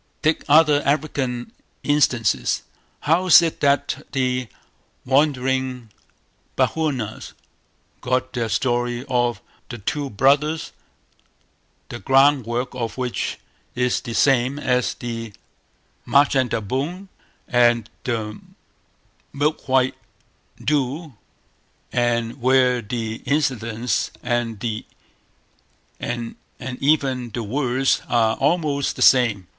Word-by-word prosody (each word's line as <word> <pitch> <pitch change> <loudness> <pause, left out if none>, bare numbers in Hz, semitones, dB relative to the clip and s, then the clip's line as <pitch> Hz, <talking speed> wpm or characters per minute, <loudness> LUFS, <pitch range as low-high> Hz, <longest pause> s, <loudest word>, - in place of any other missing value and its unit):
Take 155 +1 +2
other 150 -1 +6
African 140 -4 -1 0.3
instances. 120 - +1 0.4
How 170 +5 +2
is 175 - +9
it 165 - -2
that 140 0 +1
the 125 -2 0 0.6
wandering 130 -3 0 0.7
Bechuanas 135 -9 -1 0.7
got 130 0 -1
their 115 -2 -2
story 120 +1 -1
of 120 -2 0 0.3
"The 120 - -6
Two 140 +7 -3
Brothers", 140 +8 +2 1.2
the 120 - -7
ground 135 -1 +4
work 120 +2 -2
of 120 -2 -4
which 125 -2 -2 0.4
is 125 0 +1
the 115 - -6
same 135 0 +3
as 125 -4 0
"The 115 -2 -6 0.7
Machandelboom" 140 - +1 0.4
and 120 -2 +3 0.2
the 110 -3 -3 0.9
"Milk 145 +2 -1
white 130 0 +3 0.7
Doo", 145 +2 -1 0.8
and 120 0 0
where 125 -1 +3
the 110 0 -4
incidents 125 -5 0
and 115 -3 -2 2.0
even 130 -1 0
the 120 - -4
words 130 +3 0
are 115 -2 +2
almost 145 -2 0
the - - 0
same? 115 -8 +4
130 Hz, 95 wpm, -22 LUFS, 120-140 Hz, 2.0 s, is